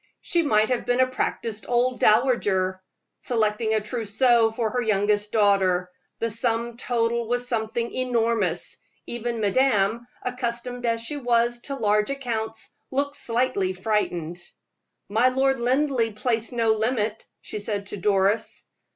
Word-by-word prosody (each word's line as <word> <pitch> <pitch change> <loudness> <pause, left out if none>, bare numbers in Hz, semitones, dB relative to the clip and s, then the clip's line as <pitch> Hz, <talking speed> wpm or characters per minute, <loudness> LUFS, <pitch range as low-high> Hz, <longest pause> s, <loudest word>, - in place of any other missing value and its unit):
She 345 - +1
might 220 -8 +2
have 245 -1 -1
been 245 +1 +2
a 255 - +6
practiced 230 -4 -3
old 245 +1 +1
dowager, 205 -5 +2 0.4
selecting 220 -1 0
a 215 - +1
trousseau 230 +1 +2
for 225 -1 -2
her 250 - 0
youngest 210 -1 +1
daughter. 195 -4 +3 0.3
The 230 0 -2
sum 230 +1 0
total 235 -1 -1
was 245 +1 +1
something 230 0 -1
enormous. 230 -8 0 0.3
Even 235 0 -4
madame, 225 0 +2 0.2
accustomed 245 0 -3
as 230 0 0
she 265 +6 -4
was 240 -2 +1
to 275 - -4
large 210 -3 +1
accounts, 230 -5 -4
looked 285 +2 -1
slightly 235 -7 0
frightened. 180 -4 -2 0.7
"My 225 +5 +3
Lord 265 0 +1
Linleigh 250 -2 +1
placed 225 +1 -1
no 230 -2 +2
limit," 220 -1 -1 0.2
she 210 - -6
said 205 -1 -3
to 205 - -6
Doris. 200 +3 +1
230 Hz, 135 wpm, -24 LUFS, 210-245 Hz, 0.7 s, a